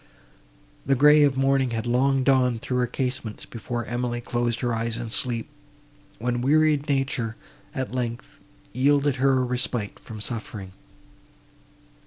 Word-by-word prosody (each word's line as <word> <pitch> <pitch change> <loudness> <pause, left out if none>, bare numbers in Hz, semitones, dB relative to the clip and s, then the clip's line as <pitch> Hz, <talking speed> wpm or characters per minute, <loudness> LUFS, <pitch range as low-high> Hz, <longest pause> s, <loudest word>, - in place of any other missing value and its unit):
The 135 - +2
grey 150 +3 +6
of 140 -2 +3
morning 135 -1 +2
had 110 - -3
long 130 +2 +2
dawned 125 -3 +2
through 125 -1 -1
her 125 - +1
casements, 125 -3 -3
before 120 0 -5
Emily 120 0 -2
closed 120 0 -2
her 120 -2 0
eyes 115 0 -2
in 115 -2 -5
sleep; 115 -1 0 0.7
when 120 +1 -1
wearied 150 +1 +3
nature, 135 -5 -1 0.4
at 130 -1 -3
length, 120 -2 -4 0.3
yielded 140 +2 +2
her 135 +1 +3
a 130 -1 +2
respite 125 -4 -1
from 110 -2 -10
suffering. 105 -3 -5
125 Hz, 140 wpm, -25 LUFS, 120-135 Hz, 0.7 s, grey